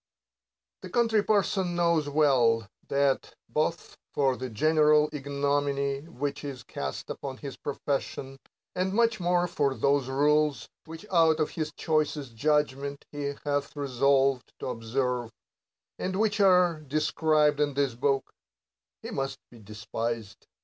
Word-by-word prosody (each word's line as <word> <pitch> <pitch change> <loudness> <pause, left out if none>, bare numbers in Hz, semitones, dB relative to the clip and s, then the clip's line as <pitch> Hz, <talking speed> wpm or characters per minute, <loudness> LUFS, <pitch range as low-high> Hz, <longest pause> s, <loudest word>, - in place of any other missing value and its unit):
The - - -8
Country 230 -3 +2
Parson 195 -4 +1
knows 170 -4 +2
well, 125 -7 +3 0.2
that, 140 -1 0
— - - -60
both 165 +2 -2 0.2
for 135 -2 +2
the 130 0 -5
general 150 +5 +4
ignominy 140 -1 -1
which 145 -2 -4
is 135 -4 -6
cast 70 -8 -5
upon 135 -2 -6
the 135 0 -8
profession, 135 -1 -3 0.4
and 185 +1 0
much 230 0 +2
more 175 0 +2
for 140 -5 0
those 140 -1 +1
rules 150 -2 +2 0.2
which 165 +4 -10
out 165 -3 +4
of 155 - 0
his 155 -2 -3
choicest 150 -5 -1
judgment 140 +1 0
he 145 -1 -3
hath 145 0 -1
resolved 135 -1 +1
to - - -5
observe, 120 0 -2 0.7
and 185 0 -2
which 215 -1 +1
are 180 -4 +4
described 150 0 +1
in 145 -2 +1
this 140 -3 +1
book, 135 +2 0 0.3
— - - -65
he - - -6
must 135 0 -3
be 120 - -14
despised. 110 +1 -5
145 Hz, 135 wpm, -28 LUFS, 135-155 Hz, 0.7 s, general